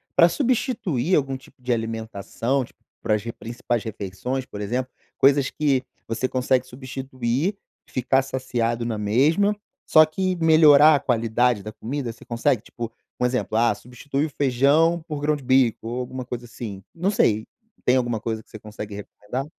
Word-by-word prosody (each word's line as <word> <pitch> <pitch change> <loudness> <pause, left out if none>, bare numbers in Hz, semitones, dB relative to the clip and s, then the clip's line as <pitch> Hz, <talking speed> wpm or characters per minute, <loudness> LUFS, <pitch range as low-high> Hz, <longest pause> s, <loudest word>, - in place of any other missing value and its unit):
pra 170 0 +7
substituir 205 - 0
algum 135 -2 0
tipo 130 -1 -15
de 125 0 0
alimentação, 115 +3 -2
tipo, - - -15 0.2
para 110 - +2
as 105 - -3
re 115 - -5
principais 120 0 -3
refeições, 110 +5 -4
por 105 -5 -8
exemplo, 125 +5 -2 0.3
coisas 135 0 +4
que 140 -4 +1 0.2
você 115 +3 -1
consegue 130 0 +1
substituir, 130 - -3 0.3
ficar 130 +1 +1
saciado 120 -3 -2
na 115 -2 -2
mesma, 145 - +2 0.3
só 155 0 +7
que 185 +4 -1
melhorar 155 -2 +7
a - - +1
qualidade 120 -2 +1
da 105 +2 -7
comida, 125 +2 -4
você 120 - -16
consegue, 120 0 +1
tipo 115 -1 -7 0.3
um 125 - +2
exemplo, 125 -3 0
ah, 115 -1 +4
substitui 125 +7 -4
o - - -4
feijão 145 +5 +3
por 150 -2 -4
grão 150 0 +1
de 140 - -12
bico, 130 -3 +2
ou 120 +2 -3
alguma 130 0 -6
coisa 120 0 -5
assim, 105 -5 -8
não 180 +4 0
sei, 110 - +2 0.4
tem 125 - +4
alguma 120 -3 0
coisa 110 0 -4
que - - -33
você 110 - -10
consegue 105 0 -8
recomendar? 105 +5 -6
125 Hz, 170 wpm, -23 LUFS, 115-140 Hz, 0.4 s, pra